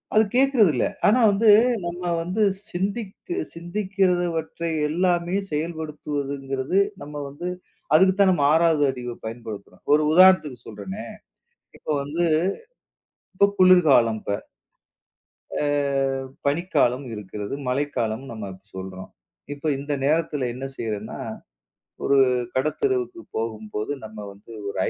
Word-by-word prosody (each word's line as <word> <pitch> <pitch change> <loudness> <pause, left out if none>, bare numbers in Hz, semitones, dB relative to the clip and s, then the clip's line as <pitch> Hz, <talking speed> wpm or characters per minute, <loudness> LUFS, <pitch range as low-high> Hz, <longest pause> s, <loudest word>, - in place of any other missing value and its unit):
அது 215 - +7
கேக்குறது 260 - +5
இல்ல. 120 - +1 0.2
ஆனா 220 +5 +5
வந்து 215 +2 +3 0.4
நம்ம 175 +1 -5 0.2
வந்து 185 +6 -2 0.3
சிந்திக்-சிந்திக்கிறவற்றை 185 - -2 0.2
எல்லாமே 175 +2 +1 0.2
செயல்படுத்துவதுங்கிறது 150 -2 -2 0.2
நம்ம 150 0 -9
வந்து 145 +6 -6 0.5
அதுக்குத்தான் 190 +3 +5
நம்ம 145 -6 +1
6வது 160 -2 +4
அறிவப் 125 -2 -7
பயன்படுத்துறோம். 110 -3 -8
ஒரு 150 - +5
உதாரணத்துக்குச் 165 -8 +5
சொல்றேனே, 100 -3 -7 0.7
இப்ப - - -12
வந்து 155 +5 -2 1.1
இப்ப 200 +2 +4
குளிர்காலம் 150 -12 +5
இப்ப. 100 - -3 1.3
ஆ, - - 0 0.8
பனிக்காலம் 140 -5 +1
இருக்கிறது. 105 +1 -6 0.2
மழைக்காலம்ன்னு 130 -2 -2
நம்ம 105 -3 -6
இப்ப 95 +1 -24
சொல்றோம். 95 0 -7 0.4
இப்ப 145 +2 -5
இந்த 145 +1 -3
நேரத்துல 150 -2 +1
என்ன 130 +2 -6
செய்றேன்னா, 110 -3 -4 0.8
"ஒரு 140 - +3 0.4
கடைத்தெருவுக்குப் 360 - -1
போகும்போது 110 +1 -4
நம்ம 110 0 -10
வந்து 100 +3 -18 0.2
ஒரு - - -6
150 Hz, 105 wpm, -24 LUFS, 120-185 Hz, 1.3 s, அது